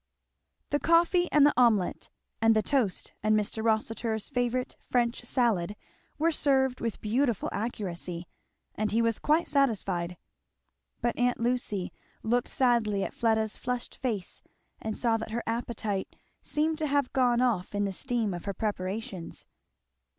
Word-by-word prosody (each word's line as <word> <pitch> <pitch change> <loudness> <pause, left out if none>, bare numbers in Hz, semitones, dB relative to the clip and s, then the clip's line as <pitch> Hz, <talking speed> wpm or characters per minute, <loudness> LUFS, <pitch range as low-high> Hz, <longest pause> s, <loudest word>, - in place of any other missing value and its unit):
The 290 - +2
coffee 345 +2 +3
and 295 -1 +6
the 295 - +5
omelette 225 -7 +2 0.3
and 225 0 +5
the 215 - +3
toast 250 -10 0
and 215 0 +3
Mr. 215 +1 -3
Rossitur's 220 0 0
favourite 245 0 -1
French 240 -1 +1
salad, 220 -7 +1 0.4
were 330 +2 +2
served 265 -4 +1
with 230 -2 -2
beautiful 235 0 +1
accuracy; 180 -5 -4 0.5
and 215 0 -1
he 225 - +2
was 230 -1 +2
quite 310 +3 +2
satisfied. 195 -11 0 0.8
But 240 - 0
aunt 245 0 +2
Lucy 230 -6 -1 0.3
looked 240 +2 +1
sadly 230 -6 +2
at - - -4
Fleda's 220 -2 +1
flushed 250 -1 -3
face 220 -8 -3 0.4
and 220 -1 -3
saw 230 -2 +2
that 225 - -6
her 235 +2 -3
appetite 225 -4 -3 0.3
seemed 310 +1 -1
to 310 - 0
have 280 -2 +1
gone 245 -2 +3
off 220 -7 +1
in 205 0 +1
the 195 - -2
steam 235 -3 -1
of 175 - -6
her 200 - -3
preparations. 195 -3 -4
230 Hz, 145 wpm, -29 LUFS, 210-250 Hz, 0.8 s, and